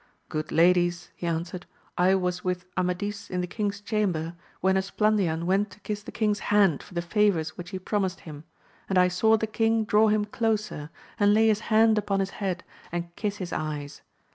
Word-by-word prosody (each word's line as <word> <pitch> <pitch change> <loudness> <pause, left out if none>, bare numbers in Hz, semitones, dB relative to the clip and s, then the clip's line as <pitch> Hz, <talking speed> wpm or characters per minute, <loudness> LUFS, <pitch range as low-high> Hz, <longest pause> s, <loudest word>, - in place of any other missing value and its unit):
Good 155 0 -3
ladies, 175 0 +3
he 175 - -5
answered, 170 +2 -3 0.3
I 185 +2 +4
was 180 -1 -1
with 180 -1 -2
Amadis 185 +3 -2
in 180 0 -1
the - - -1
king's 205 +2 -3
chamber, 195 -7 -1 0.3
when 190 +1 +2
Esplandian 190 -4 +1
went 195 +3 +2
to 185 +2 -16
kiss 210 -1 -4
the - - -9
king's 210 -2 0
hand 200 -8 +4
for 180 - -14
the 170 - -1
favours 175 -4 +1
which 175 0 -8
he 190 - -4
promised 190 0 -2
him; 150 -2 -9 0.5
and 190 - +1
I 180 0 +6
saw 220 +5 +3
the 220 - -1
king 225 0 +1
draw 210 +1 +4
him 210 0 +2
closer, 210 -8 -2 0.3
and 205 0 +5
lay 220 +1 +5
his 215 -1 +2
hand 220 0 +5
upon 200 -1 -1
his 195 0 -1
head 185 -2 -2 0.3
and 170 0 -4
kiss 205 -2 -2
his 180 -3 -5
eyes. 150 -2 -4
190 Hz, 190 wpm, -27 LUFS, 175-210 Hz, 0.5 s, I